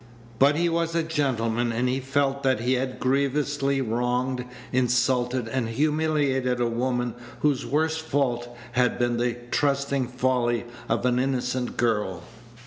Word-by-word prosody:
But 140 Hz, +2 st, +5 dB
he 170 Hz, +2 st, +2 dB
was 165 Hz, 0 st, 0 dB
a 165 Hz, -, +2 dB
gentleman, 120 Hz, -7 st, 0 dB
and 120 Hz, +2 st, 0 dB
he 130 Hz, +1 st, 0 dB
felt 135 Hz, +1 st, 0 dB
that 130 Hz, -4 st, +1 dB
he 125 Hz, +2 st, +1 dB
had 130 Hz, 0 st, -2 dB
grievously 140 Hz, +1 st, +1 dB
wronged, 125 Hz, +2 st, -1 dB, 0.3 s
insulted, 125 Hz, -1 st, +1 dB
and 115 Hz, -1 st, -1 dB
humiliated 145 Hz, -2 st, +1 dB
a 120 Hz, -, +2 dB
woman 120 Hz, 0 st, -1 dB, 0.3 s
whose 145 Hz, -3 st, +1 dB
worst 160 Hz, +2 st, +1 dB
fault 130 Hz, -6 st, -1 dB, 0.2 s
had 125 Hz, 0 st, +2 dB
been 120 Hz, -1 st, +1 dB
the 120 Hz, 0 st, 0 dB
trusting 140 Hz, -2 st, +1 dB
folly 125 Hz, -2 st, 0 dB, 0.2 s
of 115 Hz, +2 st, 0 dB
an 125 Hz, 0 st, +2 dB
innocent 125 Hz, -1 st, -1 dB
girl. 105 Hz, -6 st, 0 dB
130 Hz, 140 wpm, -25 LUFS, 120-140 Hz, 0.3 s, But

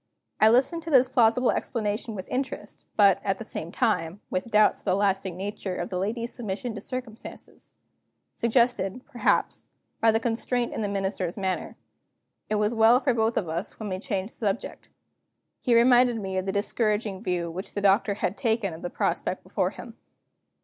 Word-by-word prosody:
I 215 Hz, -, +7 dB
listened 265 Hz, +9 st, +3 dB
to 330 Hz, -, -7 dB
this 260 Hz, -4 st, +5 dB
plausible 245 Hz, -1 st, +3 dB
explanation 215 Hz, -1 st, -2 dB
with 190 Hz, -2 st, -6 dB
interest, 265 Hz, +1 st, -4 dB
but, 200 Hz, -2 st, +5 dB
at 195 Hz, -1 st, 0 dB
the -, -, -7 dB
same 170 Hz, -5 st, -6 dB
time, 180 Hz, -6 st, 0 dB
with 185 Hz, +5 st, -2 dB
doubts 215 Hz, -1 st, +4 dB
of -, -, -23 dB
the -, -, +2 dB
lasting 195 Hz, -2 st, 0 dB
nature 195 Hz, -1 st, -4 dB
of 175 Hz, -, -4 dB
the 180 Hz, -, -2 dB
lady's 230 Hz, +5 st, -2 dB
submission 230 Hz, +1 st, -4 dB
to 210 Hz, -, -7 dB
circumstances; 255 Hz, -3 st, -8 dB, 0.6 s
suggested, 235 Hz, -2 st, +1 dB
perhaps, 250 Hz, -5 st, 0 dB, 0.3 s
by 225 Hz, -, +4 dB
the 225 Hz, -, +2 dB
constraint 240 Hz, +1 st, -1 dB
in -, -, -3 dB
the 210 Hz, -, 0 dB
Minister's 195 Hz, -2 st, -2 dB
manner. 190 Hz, -2 st, -2 dB, 0.7 s
It 215 Hz, -, +1 dB
was 210 Hz, +2 st, +1 dB
well 225 Hz, +2 st, +6 dB
for 265 Hz, -2 st, +1 dB
both 225 Hz, 0 st, +1 dB
of 180 Hz, -, 0 dB
us 165 Hz, +4 st, -4 dB
when 215 Hz, -2 st, -4 dB
we 185 Hz, 0 st, -3 dB
changed 200 Hz, -1 st, -3 dB
the -, -, -10 dB
subject. 210 Hz, -1 st, -3 dB, 0.7 s
He 240 Hz, -, +2 dB
reminded 245 Hz, 0 st, +5 dB
me 190 Hz, -2 st, -4 dB
of 185 Hz, -, -5 dB
the -, -, +1 dB
discouraging 210 Hz, -1 st, 0 dB
view 175 Hz, -5 st, -2 dB
which 185 Hz, +4 st, -7 dB
the -, -, 0 dB
Doctor 200 Hz, +1 st, +3 dB
had 190 Hz, -1 st, -2 dB
taken 220 Hz, -6 st, 0 dB
of 160 Hz, -, -9 dB
the 175 Hz, -, -4 dB
prospect -, -, -2 dB
before -, -, -1 dB
him. -, -, -11 dB
215 Hz, 185 wpm, -26 LUFS, 195-235 Hz, 0.7 s, I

